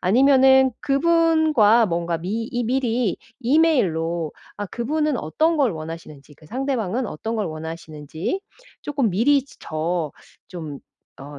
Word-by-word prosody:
아니면은 265 +5 +5
그분과 305 -7 +4
뭔가 170 -1 -1
미 205 +7 -3
이 245 0 -1
미리 240 -3 0 0.2
이메일로 180 - +1 0.2
아 205 - -4
그분은 290 +6 -1
어떤 315 - +1
걸 265 -7 +3
원하시는지, 155 -3 -9
그 155 - -19
상대방은 250 - -2
어떤 220 +9 -5
걸 210 - -1
원하시는지 160 - -5 0.4
쪼끔 275 -6 0
미리 260 +9 +3 0.2
저 160 0 -2 0.4
좀 155 -6 -7 0.4
어 145 +1 -9
220 Hz, 260 characters per minute, -22 LUFS, 165-270 Hz, 0.4 s, 아니면은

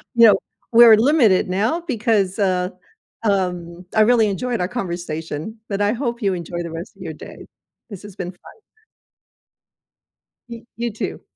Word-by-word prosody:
you 230 -1 +8
know, 205 - +7 0.4
we're 230 -2 +9
limited 235 -8 +3
now 220 - 0
because, 215 -6 0
uh, 185 -2 +1 0.6
um 180 -3 -1
I 220 - +5
really 225 -1 +4
enjoyed 235 +4 -2
our 180 - 0
conversation, 175 -3 -5
but 200 0 -2
I 205 +2 +2
hope 240 -1 -3
you 195 -2 +1
enjoy 175 0 -5
the 170 - -6
rest 165 +4 -8
of - - -16
your 160 -3 -6
day. - - -11 0.4
This 200 -2 -9
has 205 -2 -11
been 180 0 -4
fun. 180 - -17 1.9
Y 235 0 -9
you 235 0 -2
too. 215 - -5
200 Hz, 160 wpm, -20 LUFS, 180-230 Hz, 1.9 s, we're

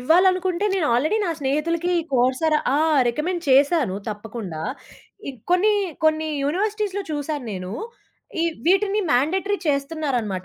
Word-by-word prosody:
ఇవ్వాలనుకుంటే 365 +5 +3
నేను 355 -5 +1
ఆల్రెడీ 310 - +2
నా 345 - -1
స్నేహితులకి 320 +5 0 0.2
కోర్సార 260 +5 +2 0.2
ఆ! - - +3 0.3
రికమెండ్ 340 +7 -2
చేశాను 275 - +4
తప్పకుండా. 210 -6 -6 0.7
ఇ - - -1 0.2
కొన్ని, 380 +4 +4 0.3
కొన్ని 315 0 +2 0.2
యూనివర్సిటీస్‌లో 405 +4 -1
చూసాను 290 -2 -3
నేను. 185 0 -6 0.7
ఈ - - +2 0.2
వీటిని 395 +3 +3
మ్యాండేటరి 370 +11 +1
చేస్తున్నారనమాట. 275 - -1
310 Hz, 115 wpm, -22 LUFS, 255-365 Hz, 0.7 s, చేశాను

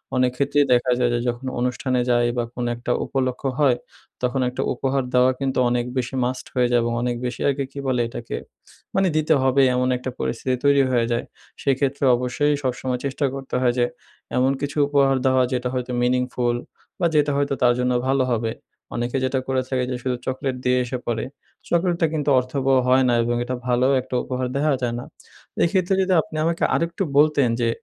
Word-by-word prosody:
অনেক 125 -1 +3
ক্ষেত্রেই 145 +1 +2
দেখা 125 +1 +2
যায় 120 -1 +2
যে, 120 - +1
যখন 120 +2 -3
অনুষ্ঠানে 125 +1 0
যাই 120 0 +3
বা 120 - +1
কোনো 120 0 -3
একটা 120 +1 -4
উপলক্ষ্য 130 0 -2
হয়, 130 -4 +4 0.5
তখন 125 +1 0
একটা 125 - -4
উপহার 135 +1 -1
দেওয়া 125 +1 +5
কিন্তু 135 -1 -1
অনেক 120 0 0
বেশি 130 +1 -2
মাস্ট 125 +1 -3
হয়ে 125 -2 +2
যায়। 120 - +4
এবং 115 0 -1
অনেক 120 0 -1
বেশি 125 - -4
আরকি, 140 0 0
কি 140 - -7
বলে 125 -2 +1
এটাকে? 115 0 -6 0.6
মানে 195 0 +3
দিতে 155 +1 +3
হবে, 135 +1 +3
এমন 125 0 +1
একটা 125 +1 -5
পরিস্থিতি 130 +2 -1
তৈরি 140 -1 +5
হয়ে 120 -2 +2
যায়। 120 - -1 0.4
সেক্ষেত্রে 140 0 0
অবশ্যই 125 +4 0
সবসময় 130 -1 -2
চেষ্টা 140 +1 -1
করতে 135 -1 -5
হয় 125 -1 +3
যে, 120 - +4 0.5
এমন 130 +1 +3
কিছু 145 +1 -3
উপহার 140 -2 +3
দেওয়া 130 -1 +4
যেটা 125 0 -1
হয়তো 125 0 -3
মিনিংফুল, 125 -1 +1 0.4
বা 175 - +1
যেটা 145 -1 +3
হয়তো 140 -1 0
তার 120 -1 +5
জন্য 125 0 +1 0.2
ভালো 135 0 +2
হবে। 115 -1 -1 0.4
অনেকে 120 +2 -1
যেটা 130 +1 0
করে 130 -1 +1
থাকে 130 -1 0
যে - - -1
শুধু 130 -1 0
চকোলেট 130 0 -2
দিয়ে 125 0 +3
এসে 125 +1 -4
পরে। 115 -2 -1 0.5
চকোলেটটা 170 -1 +2
কিন্তু 150 -2 -1
অর্থবহ 135 +1 0
হয় 130 +1 +5
না, - - +3
এবং 120 +1 0
এটা 130 +1 -3
ভালো 125 +1 +3
একটা 125 - -6
উপহার 130 0 -2
দেওয়া 150 +1 +2
যায় 120 -1 -1
না। - - -6 0.6
এই - - +4
ক্ষেত্রে 190 0 +1
যদি 190 0 +1
আপনি 155 - -11
আমাকে 170 0 0
আরেকটু 170 +3 -1
বলতেন, 145 -4 +4
যে 115 - +2
130 Hz, 195 wpm, -22 LUFS, 125-140 Hz, 0.6 s, দেওয়া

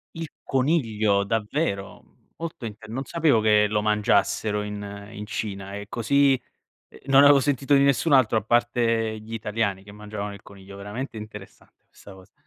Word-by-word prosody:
Il 165 0 -4 0.2
coniglio, 115 -8 +1
davvero? 105 0 -2 0.3
Molto 165 -6 -7
int 110 -1 -8
non 130 +5 -5
sapevo 155 -8 +2
che 105 -1 +4
lo 105 0 0
mangiassero 105 0 +1
in 105 0 -5 0.3
in 105 0 -7
Cina 100 -2 -5
ehm, 100 - -6
così. 135 +3 +2 0.7
Non 135 0 +6
avevo 145 0 +7
sentito 140 +1 +1
di 140 - +5
nessun 140 +3 +2
altro 130 -5 +4
a 110 - +1
parte 115 -1 +1
gli 110 +1 -12
italiani 105 -3 -2
che 100 - -13
mangiavano 105 -1 -6
il 100 - -13
coniglio. 100 0 -13
Veramente 105 +6 -6
interessante 105 -2 -12
questa 100 - -15
cosa. 95 -1 -17
110 Hz, 160 wpm, -24 LUFS, 105-130 Hz, 0.7 s, avevo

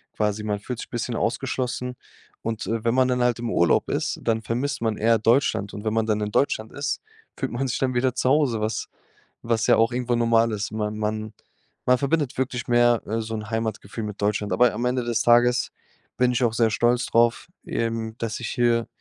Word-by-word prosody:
quasi. 105 0 -1
Man 105 -1 -2
fühlt 120 +3 -6
sich - - -7
bisschen 120 0 -3
ausgeschlossen. 125 +1 -2 0.5
Und, 115 -1 -3
äh, 115 0 -2
wenn 115 - +3
man 130 -1 +4
dann 125 -1 +1
halt 120 -1 +2
im 120 -1 -3
Urlaub 85 - +2
ist, - - -1
dann 115 -1 +1
vermisst 135 +5 -2
man 110 -2 0
eher 115 +1 +3
Deutschland. 115 -3 +2
Und 105 - -7
wenn 110 - 0
man 110 0 +1
dann 105 -1 +1
in 105 - -2
Deutschland 110 -3 0
ist, 145 0 -2 0.4
fühlt 135 - -2
man 135 +3 -2
sich 125 - -1
dann 130 -1 0
wieder 125 0 +1
zu 130 - +1
Hause, 130 -6 +2
was 110 0 -2 0.6
was 115 -1 0
ja - - +5
auch 115 +2 +3
irgendwo 125 0 0
normal 115 -1 +3
ist. 105 0 -3
Man 105 0 -3
man 110 0 -3 0.5
man 125 0 +4
verbindet 140 -1 0
wirklich 130 -1 -2
mehr, 120 -1 +4
äh, 115 +1 -1
so 110 0 -4
'n 105 -1 -6
Heimatgefühl 110 -1 -3
mit 105 -1 -7
Deutschland. 105 -1 0
Aber 125 +6 +4
am 120 +3 -2
Ende 125 0 0
des 115 -2 0
Tages 120 +1 +4 0.5
bin 125 0 +3
ich 125 - +1
auch 115 -2 +2
sehr 115 -1 +3
stolz 120 +3 +2
drauf 115 +5 +2 0.2
eben, 115 -1 -2
dass 115 -1 -3
ich - - -4
hier 120 -1 +1
115 Hz, 215 wpm, -24 LUFS, 110-125 Hz, 0.6 s, ja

